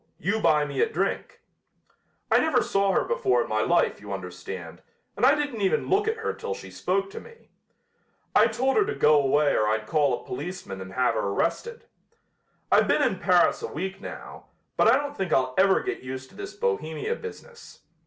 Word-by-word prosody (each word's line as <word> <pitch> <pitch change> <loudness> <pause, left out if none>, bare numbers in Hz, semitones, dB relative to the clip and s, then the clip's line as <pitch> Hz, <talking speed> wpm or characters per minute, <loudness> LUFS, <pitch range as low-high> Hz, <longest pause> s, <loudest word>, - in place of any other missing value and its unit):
You 200 +7 -1
buy 150 -7 +3
me 140 -2 -2
a - - +2
drink.' 330 - -3 0.9
I - - +6
never 295 -6 +2
saw 195 0 +1
her - - +2
before 125 -1 +1
in - - -9
my 110 0 0
life, 170 0 +1
you 105 -1 -9
understand, 90 -2 -7 0.3
and 250 - +3
I 280 - +6
didn't 290 -7 -3
even 195 +3 +1
look 410 +2 +2
at 445 +1 0
her 450 - -3
till 465 0 -5
she - - -11
spoke 390 0 -1
to 455 - -7
me. 465 0 -17 0.8
I 215 - +6
told 245 +4 0
her 420 - +4
to 440 - -3
go 150 -1 +4
away 140 +1 +2
or 105 - +2
I'd 110 0 0
call 145 -2 +1
a - - -17
policeman 140 - -6
and 95 0 -9
have 125 +2 +2
her 110 - -1
arrested. 290 - -2 0.9
I've - - +5
been - - +3
in - - 0
Paris - - +3
a 460 - -3
week 190 - -5
now, - - -9 0.3
but - - +3
I 235 +3 +6
don't 285 0 -4
think 190 - -3
I'll 130 -1 +2
ever 190 0 +4
get - - -3
used 130 0 -7
to - - -19
this 390 0 -8
Bohemia 420 - -2
business. 470 +1 -11
190 Hz, 205 wpm, -26 LUFS, -, 0.9 s, I